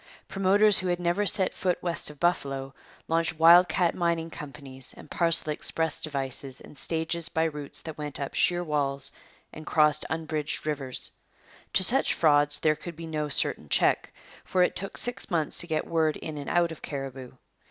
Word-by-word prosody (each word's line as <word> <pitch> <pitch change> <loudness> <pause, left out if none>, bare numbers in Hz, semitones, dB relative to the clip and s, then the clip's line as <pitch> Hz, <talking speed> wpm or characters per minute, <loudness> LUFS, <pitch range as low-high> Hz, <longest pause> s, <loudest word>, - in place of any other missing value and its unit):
Promoters 200 +1 +4
who 185 - -3
had 175 0 0
never 175 +4 +1
set 190 -1 +2
foot 180 -2 0
west 170 -4 -1
of 150 -1 -13
Buffalo 135 -6 -1 0.3
launched 165 0 0
wild 170 +2 +7
cat 175 0 +1
mining 170 -2 -1
companies 140 -3 -9
and - - -14
parcel 165 -2 +1
express 160 +1 -1
devices 135 -3 -4
and - - -14
stages 165 +2 -2
by 160 - 0
routes 150 -3 -3
that 160 -2 -8
went 150 -1 -5
up 140 - -4
sheer 175 0 +2
walls 140 -4 -1 0.4
and 155 - -9
crossed 150 -1 +3
unbridged 155 -2 -3
rivers. 140 -4 -3 0.6
To 190 - +4
such 265 +8 +4
frauds 145 -2 +4
there 155 -1 +3
could 170 +2 -9
be 165 +1 -8
no 155 -2 -3
certain 75 - +3
check; 65 - +2 0.3
for 185 -1 +2
it - - 0
took 195 - -5
six 245 +1 0
months 165 -5 0
to 175 - +2
get 155 -2 -1
word 160 -2 +1
in 155 -2 -6
and 140 - -6
out 175 -1 +2
of 160 - -9
Cariboo. 135 -3 -6
160 Hz, 180 wpm, -27 LUFS, 145-175 Hz, 0.6 s, wild